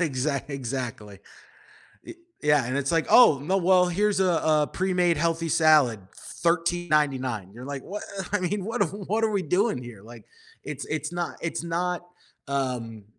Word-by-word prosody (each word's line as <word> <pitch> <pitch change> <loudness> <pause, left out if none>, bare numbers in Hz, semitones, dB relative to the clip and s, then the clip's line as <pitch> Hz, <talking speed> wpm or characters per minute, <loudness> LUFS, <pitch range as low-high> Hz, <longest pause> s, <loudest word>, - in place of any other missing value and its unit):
Exa 140 -3 -1
exactly. 125 -7 -5 0.9
E - - -8 0.3
yeah, 150 -3 +3
and 130 +3 -2
it's 140 -1 -1
like, 165 -1 +1
"Oh, 155 - +7
no, 185 +6 0
well, 180 0 +4
here's 200 +2 +1
a 190 - +4 0.4
a - - -17
pre-made 180 -2 +1
healthy 165 +1 0
salad, 150 -8 +4 0.2
$13.99." 150 - -1
You're 120 +2 -9
like, 140 -1 -6
"What? 210 +2 -6 0.3
I 205 - +1
mean, 190 +2 -2
what 225 +1 -1
are 190 - +1
what 205 +4 -3
are 220 - +1
we 200 -3 0
doing 185 - +1
here?" 120 -5 -10
Like, 115 +2 -13 0.4
it's - - -6
it's - - -3
not 175 -1 -3
it's 165 - -3
not 175 +1 -2 0.4
um, 125 -6 -3
160 Hz, 165 wpm, -25 LUFS, 130-180 Hz, 0.9 s, Oh